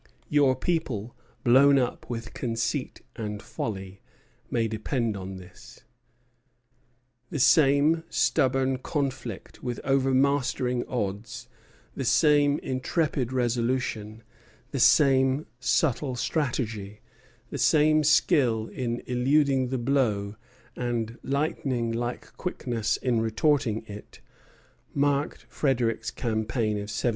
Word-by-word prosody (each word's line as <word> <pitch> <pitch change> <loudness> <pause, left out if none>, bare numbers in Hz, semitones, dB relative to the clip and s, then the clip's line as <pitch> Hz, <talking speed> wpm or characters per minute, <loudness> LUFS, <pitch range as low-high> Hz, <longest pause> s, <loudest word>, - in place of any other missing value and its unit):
Your 140 -3 +4
people, 130 - -2 0.3
blown 135 +3 +6
up 125 -2 -2
with 115 -2 -5
conceit 115 +2 -3
and 105 -3 -4
folly, 95 -3 -6 0.5
may 115 -1 0
depend 110 +1 -2
on 95 0 -6
this." 90 -1 -13 1.5
The - - -4
same 145 +3 +4
stubborn 135 -2 +1
conflict 130 - -4
with 120 -2 -4
overmastering 135 -2 +1
odds, 105 -2 -4 0.5
the - - -3
same 145 -1 +4
intrepid 130 0 -1
resolution, 120 -3 -1 0.5
the - - -2
same 135 0 +4
subtle 130 0 +1
strategy, 115 -7 -2 0.5
the - - -4
same 155 0 +4
skill 120 -6 +3
in 120 -2 -3
eluding 135 +1 +2
the 130 +1 -2
blow 115 -6 0 0.4
and 120 -1 -3
lightning 135 -4 -1
like 120 +1 -4
quickness 120 - -2
in 120 -3 0
retorting 115 -1 +1
it, 105 -1 -11 0.8
marked 145 +1 0
Frederic's 120 -5 0
campaign 110 -1 -1
of 105 0 -5
1760. 110 +3 0
125 Hz, 100 wpm, -26 LUFS, 115-140 Hz, 1.5 s, blown